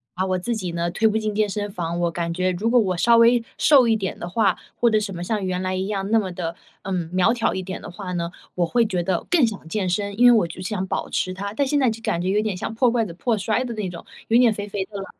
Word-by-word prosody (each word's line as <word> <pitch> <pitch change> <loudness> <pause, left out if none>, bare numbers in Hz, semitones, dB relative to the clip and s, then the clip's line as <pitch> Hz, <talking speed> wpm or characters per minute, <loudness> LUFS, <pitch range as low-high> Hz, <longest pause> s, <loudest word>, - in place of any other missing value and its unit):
把 185 - 0
我 185 -1 0
自 235 +6 -2
己 185 -5 -4
呢， 170 0 -1
推 220 +5 +2
不 220 0 +1
进 215 -1 -2
健 215 0 +2
身 205 +1 -3
房， 170 -2 -3
我 170 -1 +1
感 170 0 -3
觉 185 +1 0
如 195 +6 -1
果 245 +1 +5
我 190 -5 +1
稍 235 +6 +5
微 230 +1 +5
瘦 270 -5 +5
一 225 - +3
点 195 -3 -4
的 175 - -6
话， 195 -1 +2 0.2
或 240 - +3
者 220 - +3
什 205 -2 -4
么 170 - -6
像 205 +1 -2
原 185 0 -2
来 185 0 -2
一 190 +1 -2
样 200 -1 -3
那 225 - +5
么 190 -4 -3
的， 170 -2 -4 0.3
嗯， 180 -4 -3
苗 185 +5 +3
条 235 -2 0
一 190 - -3
点 185 0 -6
的 - - -9
话 185 0 -6
呢， 170 -1 -2 0.2
我 175 -1 +2
会 235 +7 +2
觉 185 -5 -1
得 180 -1 -1
更 330 -7 +4
想 205 -7 -5
健 190 +1 -1
身， 200 +2 -2
因 245 - +6
为 245 - +9
我 215 -7 +4
就 170 +2 -9
想 190 0 -2
保 - - -3
持 185 - -1
它。 200 +2 -5
但 280 +3 0
现 290 +2 +1
在 260 -3 +3
就 225 0 -5
感 170 -6 -1
觉 185 - -1
有 205 +2 +2
点 215 -3 -2
像 185 - -4
破 245 +2 +3
罐 230 -2 +1
子 - - -8
破 220 +6 -1
摔 215 +5 0
的 240 - -4
那 210 -4 -3
种， 175 -1 -9 0.2
有 230 - +5
点 240 -3 +5
肥 205 -1 -5
肥 195 -1 -3
的 205 0 -9
了， 195 - -5
200 Hz, 330 characters per minute, -23 LUFS, 180-225 Hz, 0.3 s, 为